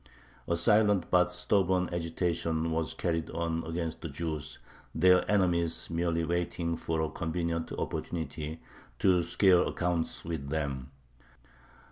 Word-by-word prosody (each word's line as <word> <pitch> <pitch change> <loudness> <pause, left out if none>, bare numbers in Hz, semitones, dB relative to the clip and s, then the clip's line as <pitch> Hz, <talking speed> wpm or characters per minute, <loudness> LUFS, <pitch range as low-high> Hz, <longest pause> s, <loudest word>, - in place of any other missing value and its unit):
A 85 - +1
silent 105 +1 +3
but 90 -1 +4
stubborn 90 0 +1
agitation 85 -1 -1
was 80 -1 -1
carried 80 -2 -1
on 85 0 -2
against 80 0 -3
the 80 - -5
Jews, 75 -1 -4 0.4
their 90 +3 +5
enemies 85 -5 +1
merely 85 0 0
waiting 85 0 -1
for 80 0 -2
a 80 - 0
convenient 85 0 -2
opportunity 80 -1 -4 0.3
to 90 -2 +4
square 90 +1 +4
accounts 85 -2 -1
with 80 -4 -4
them. 70 -4 -2
85 Hz, 120 wpm, -30 LUFS, 80-90 Hz, 0.4 s, their